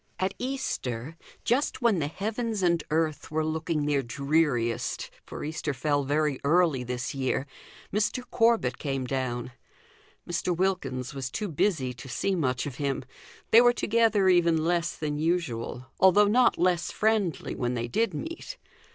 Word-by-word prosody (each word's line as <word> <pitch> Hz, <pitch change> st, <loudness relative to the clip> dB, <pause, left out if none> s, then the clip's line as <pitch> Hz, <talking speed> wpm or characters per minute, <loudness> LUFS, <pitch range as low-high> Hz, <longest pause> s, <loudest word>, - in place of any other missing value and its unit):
At 190 Hz, +1 st, -1 dB
Easter 160 Hz, -, -3 dB, 0.3 s
just 260 Hz, 0 st, 0 dB
when 220 Hz, -7 st, +4 dB
the 145 Hz, -, 0 dB
heavens 215 Hz, +4 st, -3 dB
and 170 Hz, -2 st, +2 dB
earth 155 Hz, -1 st, 0 dB
were 155 Hz, 0 st, 0 dB
looking 155 Hz, -1 st, -1 dB
their 145 Hz, -2 st, +2 dB
dreariest, 135 Hz, -2 st, 0 dB, 0.2 s
for -, -, -7 dB
Easter 155 Hz, -1 st, -3 dB
fell 145 Hz, +2 st, +1 dB
very 145 Hz, -1 st, +1 dB
early 155 Hz, -3 st, +3 dB
this 125 Hz, 0 st, -3 dB
year 135 Hz, 0 st, -1 dB, 0.5 s
Mr. 210 Hz, +4 st, 0 dB
Corbet 230 Hz, -1 st, +2 dB
came 135 Hz, -3 st, -2 dB
down. 125 Hz, -2 st, -2 dB, 0.8 s
Mr. 175 Hz, 0 st, -1 dB
Wilkins 145 Hz, -9 st, -1 dB
was 135 Hz, -2 st, -4 dB
too 210 Hz, +10 st, -3 dB
busy 150 Hz, -6 st, 0 dB
to 125 Hz, +2 st, -11 dB
see 135 Hz, +11 st, 0 dB
much 130 Hz, -8 st, 0 dB
of 135 Hz, -4 st, -6 dB
him; 140 Hz, -2 st, -2 dB, 0.5 s
they 230 Hz, -, +9 dB
were 245 Hz, 0 st, +5 dB
together 225 Hz, -4 st, +2 dB
even 170 Hz, -3 st, +4 dB
less 170 Hz, 0 st, 0 dB
than 150 Hz, -1 st, -3 dB
usual, 150 Hz, -7 st, -1 dB
although 190 Hz, +2 st, +6 dB
not 245 Hz, +4 st, +4 dB
less 175 Hz, -2 st, +1 dB
friendly 215 Hz, -6 st, 0 dB
when 125 Hz, 0 st, -2 dB
they 120 Hz, 0 st, -2 dB
did 225 Hz, -, 0 dB
meet. 335 Hz, +10 st, -6 dB
160 Hz, 150 wpm, -27 LUFS, 135-195 Hz, 0.8 s, they